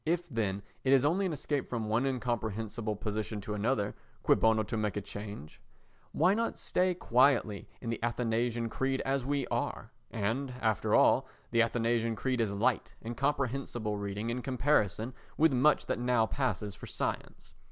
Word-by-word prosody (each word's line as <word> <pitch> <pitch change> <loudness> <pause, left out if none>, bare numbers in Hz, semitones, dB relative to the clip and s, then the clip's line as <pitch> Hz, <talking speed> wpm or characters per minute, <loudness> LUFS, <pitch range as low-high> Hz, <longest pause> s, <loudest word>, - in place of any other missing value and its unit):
If, 175 +2 0
then, 100 -6 -1 0.2
it 135 - +4
is 135 0 +5
only 185 +6 +2
an - - -2
escape 145 -1 -2
from 115 -3 -2
one 115 +5 +1
incomprehensible 115 -3 -2
position 105 0 -3
to 105 +2 -4
another, 105 0 0 0.3
cui - - +5
bono 110 -1 +3
to 115 - -4
make 105 -3 -1
a - - -1
change? 100 -6 -8 0.5
Why 185 - +4
not 230 +2 -1
stay 180 0 +1
quietly 125 - +2
in 115 - -3
the 115 - -4
Athanasian 120 0 0
Creed 135 +3 -1
as 135 -1 -1
we 140 -2 0
are? - - -2 0.2
And, 120 +5 -2
after 110 -4 +1
all, - - +5 0.2
the 115 -1 +4
Athanasian 115 0 +1
Creed 125 +1 0
is 110 - +1
light 110 +5 0
and 120 +1 -4
comprehensible 130 -5 -1
reading 100 +2 -3
in 125 +1 -2
comparison 125 -3 +1 0.2
with 160 -2 +5
much 140 +4 +4
that - - -1
now 120 -2 +3
passes 110 -5 -2
for - - -10
science. - - -4
120 Hz, 170 wpm, -31 LUFS, 110-135 Hz, 0.5 s, is